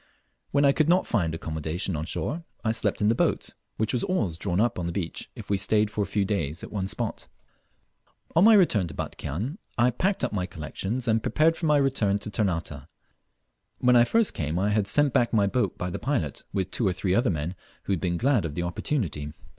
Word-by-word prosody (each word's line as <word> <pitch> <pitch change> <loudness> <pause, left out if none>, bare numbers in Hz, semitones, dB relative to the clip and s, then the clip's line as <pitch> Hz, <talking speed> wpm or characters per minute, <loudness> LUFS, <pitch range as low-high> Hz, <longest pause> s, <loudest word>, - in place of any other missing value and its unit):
When 140 0 +3
I 140 - +6
could 155 +2 +1
not 180 +2 +4
find 85 -8 0
accommodation 80 +3 -3
on 75 +1 -3
shore 155 - -3 0.2
I 110 - +2
slept 110 -3 -1
in 105 - +3
the 110 - +4
boat, - - 0 0.3
which 110 0 0
was 125 - 0
always 110 - 0
drawn 90 +2 -1
up 115 -3 +1
on 85 - -2
the - - -2
beach 85 -2 -4
if - - -9
we 100 - +1
stayed 105 +1 +2
for 105 - -2
a 100 - 0
few 100 -2 0
days 85 -6 -2
at - - -8
one 95 -3 -2
spot. - - -3 1.1
On 165 - +6
my 225 0 +8
return 115 - +4
to 75 - -9
Batchian 110 - -4 0.2
I 120 +2 +4
packed 190 - 0
up - - 0
my 90 -3 -1
collections, 95 +9 -4
and 110 0 +3
prepared 160 +7 +2
for 165 - -2
my 150 -1 +5
return 130 -8 +2
to 105 +1 -6
Ternate. 85 -9 -2 0.9
When 125 0 +4
I 120 - +7
first 225 - +2
came 80 +1 -2
I 100 +3 +1
had 105 -1 +1
sent 145 +4 +3
back 120 -3 +2
my 105 -3 +4
boat 120 +5 0
by 90 0 -3
the - - -4
pilot, 115 - -2
with 95 -3 -2
two 115 - +1
or 95 - +1
three 90 0 -1
other 120 +5 +3
men 80 0 -2 0.3
who 100 - -1
had 90 - -2
been 85 -2 0
glad 125 0 +2
of 75 -3 -4
the 85 - -2
opportunity. 85 - -2
105 Hz, 225 wpm, -26 LUFS, 85-125 Hz, 1.1 s, my